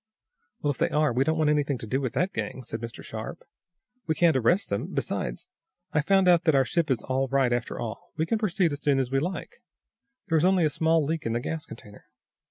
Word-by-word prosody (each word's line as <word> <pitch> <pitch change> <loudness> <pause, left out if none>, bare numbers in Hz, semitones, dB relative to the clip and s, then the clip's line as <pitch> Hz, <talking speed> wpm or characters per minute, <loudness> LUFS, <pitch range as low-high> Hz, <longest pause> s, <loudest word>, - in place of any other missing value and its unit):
"Well, 145 - +2
if 140 - -7
they - - +2
are, 150 -3 +2
we 130 +3 +2
don't 160 +2 0
want 155 -1 +3
anything 145 -2 +1
to 115 - -8
do 130 +5 -1
with 130 -4 -2
that 185 +2 0
gang," 130 - -4
said 115 -1 -6
Mr. 115 -1 -7
Sharp. - - -7 0.6
"We 160 - +1
can't 170 -2 +4
arrest 150 - +2
them. 100 - -1
Besides - - -3 0.5
I've 150 0 +1
found 195 -1 +4
out 175 -1 +5
that 160 -3 +4
our 135 -1 +4
ship 165 +6 0
is 125 -4 0
all 130 +1 0
right, 135 -2 +2
after 120 -1 -2
all. 110 -2 -6
We 160 - +1
can 220 +6 0
proceed 190 -5 +1
as 145 0 -5
soon 145 -2 +2
as 130 -2 -1
we 135 - +2
like. 185 - -5 0.7
There 160 -2 +3
is - - 0
only 185 -2 +4
a 155 - +1
small 160 -1 +2
leak 160 -3 -2
in 115 - -1
the 120 - 0
gas 160 +5 -4
container. 105 -2 -12
150 Hz, 240 wpm, -27 LUFS, 130-165 Hz, 0.7 s, out